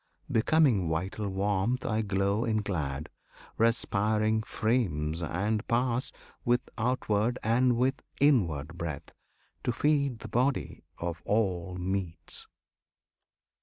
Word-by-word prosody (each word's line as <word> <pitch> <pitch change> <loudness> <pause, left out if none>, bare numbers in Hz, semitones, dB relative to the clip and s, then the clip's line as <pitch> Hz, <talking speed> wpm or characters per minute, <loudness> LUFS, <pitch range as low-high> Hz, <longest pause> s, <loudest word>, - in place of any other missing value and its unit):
Becoming 115 - +3
vital 95 +6 -2
warmth, 100 +5 0
I 110 0 +1
glow 100 +1 +1
in 110 -2 0
glad, 75 -7 -2 0.5
respiring 110 -1 +2
frames, 90 -10 0
and 100 +7 0
pass, 120 +1 +1 0.3
With 120 +1 +1
outward 115 -1 +1
and 120 +2 +3
with 130 +2 +1 0.2
inward 90 - +2
breath, 80 -4 -5 0.5
to - - +1
feed 140 0 +1
The - - -6
body 125 +5 0
by 85 0 -1
all 95 -4 0
meats. 90 -1 -4
110 Hz, 105 wpm, -29 LUFS, 90-120 Hz, 0.5 s, Becoming